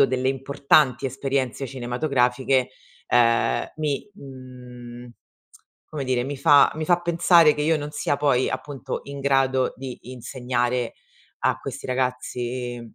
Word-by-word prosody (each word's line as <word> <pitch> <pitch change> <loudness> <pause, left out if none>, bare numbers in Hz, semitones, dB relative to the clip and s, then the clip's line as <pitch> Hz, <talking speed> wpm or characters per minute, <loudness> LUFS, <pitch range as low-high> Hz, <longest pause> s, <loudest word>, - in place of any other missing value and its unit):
avuto 140 - +7
delle 130 0 -1
importanti 135 -1 +2
esperienze 135 0 -2
cinematografiche, 125 0 0 0.4
ehm, 115 -1 +3
mi 150 0 -2
mhmm, 125 -4 -11 0.8
come 145 -3 -4
dire, 125 -1 0
mi 140 +1 -5
fa 145 +1 +6
mi 155 0 -3
fa 175 +1 +2
pensare 170 -2 +5
che 150 - -2
io 160 +1 +2
non 145 0 -6
sia 145 - -1
poi, 135 -3 +2
appunto, 135 -3 -5
in 140 0 -8
grado 135 -1 +1
di 130 -1 -7
insegnare 125 -1 -2 0.5
a - - 0
questi - - -7
ragazzi 125 -1 -3
130 Hz, 130 wpm, -23 LUFS, 125-140 Hz, 0.8 s, avuto